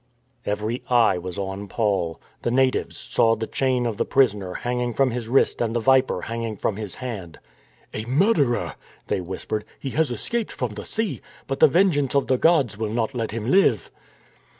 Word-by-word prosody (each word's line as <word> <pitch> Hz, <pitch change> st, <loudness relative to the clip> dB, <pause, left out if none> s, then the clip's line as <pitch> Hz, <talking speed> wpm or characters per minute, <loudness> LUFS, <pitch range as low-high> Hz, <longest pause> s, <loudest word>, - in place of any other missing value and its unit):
Every 105 Hz, +4 st, -2 dB
eye 120 Hz, -7 st, +4 dB
was 90 Hz, 0 st, -6 dB
on 100 Hz, +1 st, -4 dB
Paul. 95 Hz, -8 st, -1 dB, 0.2 s
The -, -, -1 dB
natives 130 Hz, +1 st, +1 dB
saw 115 Hz, 0 st, +2 dB
the 110 Hz, 0 st, -3 dB
chain 130 Hz, 0 st, 0 dB
of 115 Hz, -3 st, -2 dB
the -, -, +1 dB
prisoner 105 Hz, -9 st, +1 dB
hanging 120 Hz, -1 st, -2 dB
from 135 Hz, -2 st, +3 dB
his 120 Hz, -1 st, -4 dB
wrist 135 Hz, 0 st, +2 dB
and 115 Hz, -1 st, 0 dB
the -, -, +2 dB
viper 130 Hz, -5 st, +3 dB
hanging 115 Hz, -2 st, -4 dB
from 100 Hz, -, -1 dB
his 105 Hz, -4 st, -5 dB
hand. 105 Hz, -10 st, -6 dB, 0.3 s
" -, -, -33 dB
A 110 Hz, -, -3 dB
murderer! 140 Hz, -, +2 dB, 0.2 s
" -, -, -29 dB
they -, -, 0 dB
whispered. 95 Hz, +4 st, -4 dB
" -, -, -31 dB
He 135 Hz, -, -4 dB
has 155 Hz, +1 st, +1 dB
escaped 220 Hz, -, -2 dB
from 125 Hz, -4 st, -3 dB
the 105 Hz, 0 st, -7 dB
sea; 220 Hz, -2 st, -2 dB, 0.2 s
but 135 Hz, -, -3 dB
the 155 Hz, -, +8 dB
vengeance 145 Hz, -5 st, +2 dB
of 140 Hz, -, +3 dB
the 130 Hz, -1 st, +1 dB
gods 140 Hz, -, +3 dB
will 110 Hz, -1 st, -1 dB
not 115 Hz, +3 st, -1 dB
let 115 Hz, -3 st, -2 dB
him 115 Hz, +3 st, -3 dB
live." 135 Hz, -, +3 dB
120 Hz, 195 wpm, -24 LUFS, 105-135 Hz, 0.3 s, the